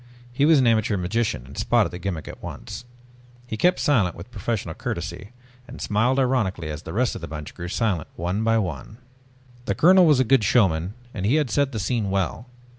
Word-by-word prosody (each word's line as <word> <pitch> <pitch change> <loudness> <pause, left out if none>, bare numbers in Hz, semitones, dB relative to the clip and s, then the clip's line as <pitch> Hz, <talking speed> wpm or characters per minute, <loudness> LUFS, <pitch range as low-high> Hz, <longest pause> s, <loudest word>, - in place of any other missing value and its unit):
He 140 +3 +2
was 160 -1 +6
an 130 - +3
amateur 110 -3 +2
magician 95 - -1
and 70 +2 -12
spotted - - +2
the 90 - -7
gimmick 85 -5 -4
at - - -9
once. - - -8 0.6
He 115 - -5
kept 180 +10 +3
silent 105 - +2
with 85 +9 -11
professional 105 -5 -3
courtesy, 100 +5 -5 0.4
and - - -10
smiled 115 +5 +1
ironically 110 - 0
as 75 - -6
the - - -8
rest 120 +5 +1
of - - -7
the 85 - -6
bunch 75 -1 -7
grew 90 -1 -7
silent 95 -4 -1
one 90 +6 -2
by 115 0 +3
one. 90 - -4 0.7
The 100 - -1
colonel 180 - +6
was 150 -4 +5
a - - +5
good 130 -1 +3
showman 95 -3 +2 0.2
and 95 - -4
he 110 +8 +3
had 150 -6 +1
set 140 +2 +1
the 115 - -4
scene 105 0 -1
well. 100 +5 -2
105 Hz, 205 wpm, -24 LUFS, 90-125 Hz, 0.7 s, was